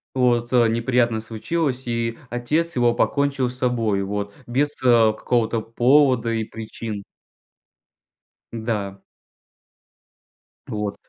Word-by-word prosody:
Вот, 120 -1 +2
э, 120 -2 +5
неприятность 115 -1 +1
случилась, 130 +3 -2
и 115 -1 -2
отец 155 +8 -1
его 120 -1 +3
покончил 140 0 +1
с 125 - -9
собой, 115 -6 0
вот 100 +1 -3
без, 140 +5 +1
э, 115 -3 +5
какого-то 115 0 0
повода 125 +1 +3
и 115 -1 -1
причин. 110 -1 -7 1.5
Да. 105 -4 -4 1.6
Вот. 105 -1 -3
120 Hz, 105 wpm, -22 LUFS, 110-125 Hz, 1.6 s, э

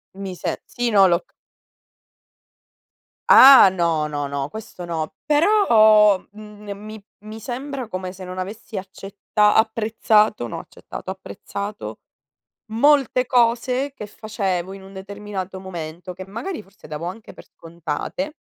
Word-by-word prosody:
Mi 195 -2 -6
se - - -4
sì, 245 -1 -2
no, 195 -2 +6
lo 170 0 +2
c - - -38 2.0
Ah, 265 -7 +10
no, 165 -4 0
no, 145 -1 -3
no, 140 0 -3
questo 220 -4 -9
no. 160 -2 -4
Però, 220 - +5 0.2
mhmm, 210 -1 -13
n 200 - -5
mi 215 0 -10 0.2
mi 215 +2 -10
sembra 260 +2 -5
come 185 -3 -5
se 185 0 -10
non 185 +1 -8
avessi 200 +3 -6
accetta 200 +2 -1
apprezzato, 220 - +2
no - - -6
accettato, - - -10
apprezzato, 195 - -7 0.7
molte 260 0 +3
cose 250 +3 +1
che 210 - -7
facevo 195 -4 -3
in 195 -1 -11
un 195 +1 -13
determinato 195 -1 -7
momento, 175 -1 -7
che 185 +1 -10
magari, 230 - -5
forse, 195 -4 -18
davo 155 +2 -6
anche 210 +5 -8
per - - -14
scontate 170 - -5
205 Hz, 135 wpm, -22 LUFS, 185-225 Hz, 2.0 s, Ah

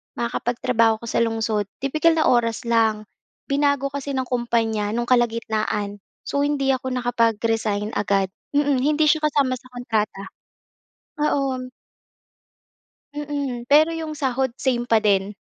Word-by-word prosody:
makakapagtrabaho 230 -1 +1
ako - - -5
sa - - +1
lungsod, 225 -2 0 0.2
tipikal 310 +4 +3
na 315 - +2
oras 230 -1 +2
lang. 225 -2 +2 0.5
Binago 280 -1 +1
kasi 280 0 -4
ng 260 - 0
kumpanya 225 -4 -1
no'ng 240 0 -1
kalagitnaan. 220 -4 0 0.2
So, 280 - -2
hindi 285 -1 +1
ako 260 0 -2
nakapag-resign 225 -4 0
agad. 195 -1 +1 0.2
Mm. 285 -2 +2
Hindi 300 +4 +2
siya 305 +1 +4
kasama 270 -4 +1
sa 255 - -18
kontrata. 220 -5 -2 1.0
Oo. 265 -3 -1 1.5
Mm. 285 -5 -4
Pero 310 +3 +5
'yong 320 -2 -5
sahod 265 -1 0
same 245 -3 -1
pa 225 - +5
din. 200 -1 +1
245 Hz, 130 wpm, -22 LUFS, 225-280 Hz, 1.5 s, Pero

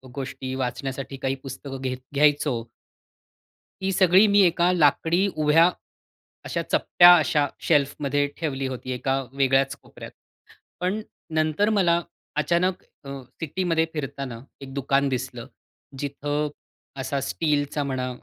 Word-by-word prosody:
गोष्टी 130 -1 -5
वाचण्यासाठी 135 +1 -4
काही 135 0 0
पुस्तकं 135 0 -7
घ्याय 130 -1 -2 0.2
घ्यायचो. 145 -4 +2 1.2
ही 195 - 0
सगळी 185 +1 +5
मी 205 - +7
एका 175 +1 +2
लाकडी 165 +4 +3
उभ्या, 155 +3 +4 0.7
अशा - - -2
चप्प्या 175 0 +6
अशा 150 -2 +2 0.2
शेल्फमध्ये 145 -1 +2
ठेवली 135 -4 -2
होती. 130 0 -6
एका 135 +2 -1
वेगळ्याच 135 0 +2
कोपऱ्यात. - - -12 0.7
पण 185 +5 -1 0.3
नंतर 155 +6 +2
मला 175 -5 +3 0.3
अचानक 175 +4 +1 0.2
अ, 140 - -7 0.3
सिटीमध्ये 165 0 0
फिरताना 140 -5 -5 0.2
एक 135 -1 -9
दुकान 140 0 +1
दिसलं. 125 -2 -4 0.5
जिथं 145 +1 -2 0.5
असा 140 +1 -2
स्टीलचा 145 0 -1
म्हणा 130 -2 -2
145 Hz, 115 wpm, -24 LUFS, 135-165 Hz, 1.2 s, मी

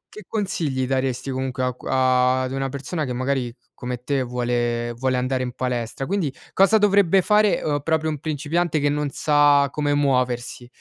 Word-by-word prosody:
che 215 - -9
consigli 155 - -2
daresti 130 0 -1
comunque 130 -1 -3
a 125 -1 0
q - - -16
a 130 0 +2
ad 130 - -3
una 135 0 -2
persona 140 +4 -4
che 125 - -5
magari 130 -1 -2 0.2
come 125 0 -5
te 140 +1 0
vuole 120 -1 -1
vuole 130 +1 -1
andare 130 0 -1
in 125 - -4
palestra? 125 0 -3
Quindi, 180 -8 -1 0.2
cosa 195 +3 +5
dovrebbe 200 -2 +4
fare, 210 +2 +3
uhm, 145 -1 0
proprio 160 0 0
un 150 -2 -4
principiante 155 +2 -1
che 145 - +1
non 145 0 -1
sa 145 -1 +3
come 145 -1 0
muoversi? 125 -3 0
135 Hz, 180 wpm, -22 LUFS, 125-155 Hz, 0.2 s, cosa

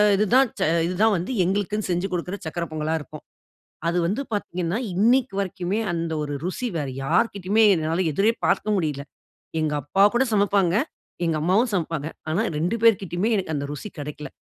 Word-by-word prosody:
இதுதான் 235 +6 +4
ச - - +2 0.2
இதுதான் 205 +5 +2
வந்து 175 +8 -4
எங்களுக்குன்னு 205 +3 -1
செஞ்சு 175 +2 0
குடுக்கிற 180 +2 -3
சர்க்கர 170 +2 -3
பொங்கலா 155 +1 -1
இருக்கும். 150 - -10 0.7
அது 170 +1 +1
வந்து 205 +9 -1
பார்த்தீங்கன்னா, 180 -2 -2 0.2
இன்னைக்கு 240 +4 +3
வரைக்குமே 185 +1 -2
அந்த 165 -1 -2
ஒரு 145 -1 -3
ருசி 190 +8 -2
வேற 145 -4 -2 0.2
யார்கிட்டயுமே 205 - +2
என்னால 165 +2 0
எதிரே 200 +9 +3
பார்க்க 215 - +1
முடியல. 150 -6 -2 0.6
எங்க 155 -1 0
அப்பா 170 +9 +1
கூட 245 +2 +4
சமப்பாங்க, 200 -4 +3 0.5
எங்க 165 -1 +1
அம்மாவும் 200 +9 +3
சமப்பாங்க. 165 -4 -2 0.2
ஆனா, 175 +7 +1 0.2
2 175 +8 0
பேர்கிட்டயுமே 195 -2 +3
எனக்கு 185 -5 -2
அந்த 140 0 -3
ருசி 150 +8 -7
கெடைக்கல. 145 -1 -6
180 Hz, 160 wpm, -24 LUFS, 160-210 Hz, 0.7 s, இதுதான்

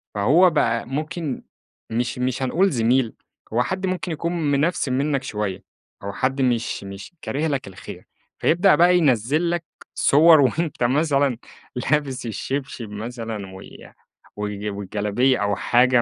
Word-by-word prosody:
فهو 155 - +5
بقى 115 -8 +1
ممكن 150 +1 -4 0.5
مش 120 +2 -2
مش 130 +1 -1
هنقول 185 +9 +2
زميل، 120 -1 +2 0.4
هو 120 +2 +3
حد 190 +4 -3
ممكن 185 -1 -2
يكون 165 -1 -1
منفسن 140 -2 +1
منّك 140 -1 0
شويّة 105 -6 -4 0.4
أو 100 0 -4
حد 135 +5 -1
مش 120 -5 0
مش 100 - -9
كاره 150 +4 -2
لك 140 -8 -2
الخير، 95 - -10 0.3
فيبدأ 175 +2 +4
بقى 175 +3 +5
ينزل 145 +3 +2
لك 175 -1 -1 0.3
صور 160 +2 +6
وأنت 150 0 0
مثلًا 140 -1 +2 0.4
لابس 135 0 -1
الشبشب 120 +1 -4
مثلًا 110 -2 -6
وي - - -13 0.4
وال 105 0 -4
والجلبية 105 +6 0
أو 100 -1 +1
حاجة 125 0 +3
130 Hz, 135 wpm, -22 LUFS, 115-155 Hz, 0.5 s, صور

